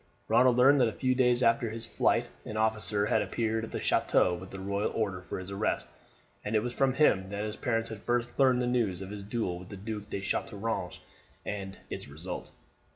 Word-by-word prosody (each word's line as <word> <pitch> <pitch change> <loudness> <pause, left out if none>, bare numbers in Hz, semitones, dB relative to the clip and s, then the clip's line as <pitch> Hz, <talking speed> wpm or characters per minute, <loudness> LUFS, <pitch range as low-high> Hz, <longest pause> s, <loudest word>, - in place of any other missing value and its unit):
Ronald 125 0 +5
learned 135 +2 +6
that 120 - +5
a - - -1
few 130 -1 +1
days 125 -1 +3
after 115 0 +3
his 115 +1 -5
flight - - +1 0.2
an 110 - -5
officer 110 -2 +1
had - - +2
appeared 110 -1 -1
at 115 - -5
the - - -3
chateau 90 - +3
with 95 +2 -6
the 95 - -8
royal 100 +2 -1
order 100 -5 -1
for 90 - -6
his 95 +1 -6
arrest, 100 +2 -1 0.5
and 105 +2 -2
it 105 - +3
was 125 0 -3
from 135 0 +2
him 100 -10 +3
that 100 +1 -3
his 105 0 -3
parents 115 -2 -1
had 110 -2 -7
first 120 +1 -1
learned 130 -2 +4
the - - +1
news 115 -7 0
of 95 - -8
his 105 -1 -6
duel 100 -4 -2
with 90 - -11
the 100 - -8
Duke 105 +1 -6
of 100 - -3
Chateaurouge 110 +2 -2 0.5
and 95 -2 -5
its - - -5
result. 80 +6 -6
110 Hz, 220 wpm, -30 LUFS, 100-120 Hz, 0.5 s, learned